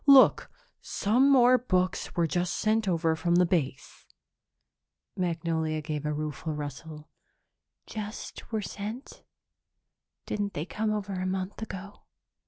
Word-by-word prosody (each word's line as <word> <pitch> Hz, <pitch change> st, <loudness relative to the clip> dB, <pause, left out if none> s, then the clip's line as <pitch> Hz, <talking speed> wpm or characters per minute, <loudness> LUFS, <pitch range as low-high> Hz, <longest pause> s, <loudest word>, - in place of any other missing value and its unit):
Look, 275 Hz, -2 st, +7 dB, 0.3 s
some 245 Hz, +7 st, +2 dB
more 255 Hz, -2 st, +6 dB
books 185 Hz, -6 st, 0 dB
were 170 Hz, -, +3 dB
just 175 Hz, +2 st, 0 dB
sent 220 Hz, 0 st, +1 dB
over 165 Hz, -3 st, +2 dB
from 170 Hz, +1 st, +1 dB
Base." 170 Hz, -7 st, 0 dB, 1.1 s
Magnolia 165 Hz, -3 st, -1 dB
gave 150 Hz, -1 st, -3 dB
a -, -, 0 dB
rueful 155 Hz, +1 st, -3 dB
rustle. 150 Hz, +1 st, -7 dB, 0.7 s
"Just 215 Hz, +2 st, -7 dB
were 220 Hz, -2 st, -1 dB
sent? 215 Hz, +7 st, -6 dB, 1.0 s
Didn't 205 Hz, -1 st, -2 dB
they 150 Hz, -, -2 dB
come 215 Hz, +3 st, -1 dB
over 205 Hz, -2 st, -2 dB
a 185 Hz, 0 st, -2 dB
month 190 Hz, +3 st, -3 dB
ago?" 200 Hz, -1 st, -7 dB
185 Hz, 120 wpm, -28 LUFS, 160-215 Hz, 1.1 s, Look